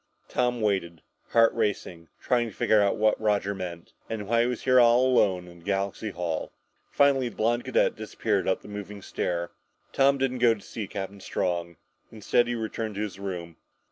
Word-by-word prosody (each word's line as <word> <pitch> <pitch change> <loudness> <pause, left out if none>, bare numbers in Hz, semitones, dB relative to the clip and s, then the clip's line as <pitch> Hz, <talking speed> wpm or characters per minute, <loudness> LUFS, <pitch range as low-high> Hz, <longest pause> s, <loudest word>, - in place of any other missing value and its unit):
Tom 125 -1 0
waited, 90 -6 -1 0.3
heart 115 -1 +5
racing, 90 -5 -2
trying 120 -2 +1
to 105 - -15
figure 110 -1 +3
out 100 -1 +2
what 110 0 +2
Roger 100 -2 +1
meant, 90 -3 -7 0.2
and 105 -3 -4
why 115 +1 +3
he 120 - +2
was 125 -1 -3
here 130 -1 +5
alone 120 -7 +4
in 85 -1 -14
Galaxy 100 +3 -2
Hall. 85 -4 -3 0.4
Finally 135 -3 +3
the - - -15
blond 120 +2 +1
cadet - - +2
disappeared - - -2
up 95 - 0
the - - -11
moving 105 -1 -7
stair. 85 -1 -2 0.4
Tom 140 +1 +4
didn't 130 -1 -1
go 120 -2 +5
to 105 - -14
see 105 0 -6
Captain 100 0 -6
Strong. 85 -2 -2 0.4
Instead, 115 +2 +1
he 120 - -1
returned 110 -1 -4
to 100 - -3
his 105 -2 -4
room. 90 -4 -6
105 Hz, 180 wpm, -27 LUFS, 95-120 Hz, 0.4 s, heart